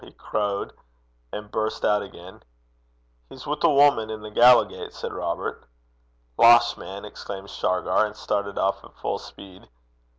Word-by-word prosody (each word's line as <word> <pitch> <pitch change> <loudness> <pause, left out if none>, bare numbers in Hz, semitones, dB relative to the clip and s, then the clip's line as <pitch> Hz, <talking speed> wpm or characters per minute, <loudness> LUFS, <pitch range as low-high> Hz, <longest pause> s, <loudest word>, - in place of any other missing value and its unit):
he - - -13
crowed; 100 -1 -3 0.6
and 105 0 -7
burst 110 0 -2
out 105 0 +3
again. 95 -1 -12 0.9
'He's 130 - -11
wi' 150 - -1
a 170 - +5
wuman 140 -6 +4
i' 110 - -3
the 105 0 -10
Gallowgate,' 125 +3 +4
said - - -6
Robert. - - -4 0.8
'Losh, 120 0 +7
man!' 100 +2 -9
exclaimed 100 -1 -8
Shargar, 95 +3 +1
and 105 - -11
started 100 -1 -3
off 95 +1 0
at - - -16
full - - -3
speed. 95 -2 -14
105 Hz, 145 wpm, -24 LUFS, 100-115 Hz, 0.9 s, Losh